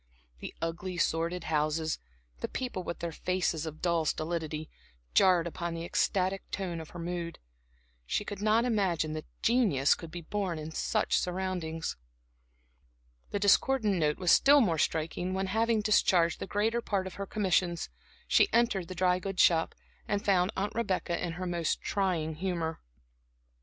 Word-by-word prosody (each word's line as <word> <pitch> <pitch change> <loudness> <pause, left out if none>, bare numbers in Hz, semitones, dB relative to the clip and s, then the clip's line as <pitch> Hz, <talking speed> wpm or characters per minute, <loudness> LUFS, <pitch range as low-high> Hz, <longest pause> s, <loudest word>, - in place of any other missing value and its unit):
The - - -7
ugly, 175 +2 -3
sordid 170 +1 0
houses, 155 +1 0 0.4
the - - -2
people 250 -8 -4
with 170 - -6
their 170 -1 -2
faces 165 -2 -1
of 155 0 -8
dull 170 -2 +2
stolidity, 155 -1 -2 0.5
jarred 180 - +5
upon 170 0 -4
the 165 0 -4
ecstatic 190 +2 0
tone 175 -4 -3
of 160 - -10
her - - -10
mood. 170 0 -4 0.7
She 210 - -1
could 205 -1 -6
not 220 +3 +3
imagine 185 -9 +1
that 155 0 -6 0.2
genius 215 - +4
could 165 - -7
be 170 +1 -7
born 190 -1 -2
in 155 +1 -6
such - - +1
surroundings. 180 - -3 1.3
The - - -2
discordant 210 +2 +3
note 150 -2 +1
was 180 -2 +2
still 285 +1 +7
more 175 - +2
striking 165 +4 -1
when, 190 0 0
having 220 +3 +1
discharged 185 -5 +3
the - - -5
greater 225 +4 0
part 200 -4 -1
of 190 - -6
her 200 - -3
commissions, 180 -4 0 0.4
she 400 - +4
entered 230 -7 +2
the 185 - -7
dry 180 0 +2
goods 195 0 +1
shop, 165 -1 +3 0.3
and 205 -1 -1
found 185 -1 +3
Aunt 200 +2 -1
Rebecca 190 -6 -1
in 170 -2 -2
her 185 +2 -5
most 170 -3 -1
trying 180 -6 -1
humor. 170 -3 -2
180 Hz, 160 wpm, -30 LUFS, 165-200 Hz, 1.3 s, still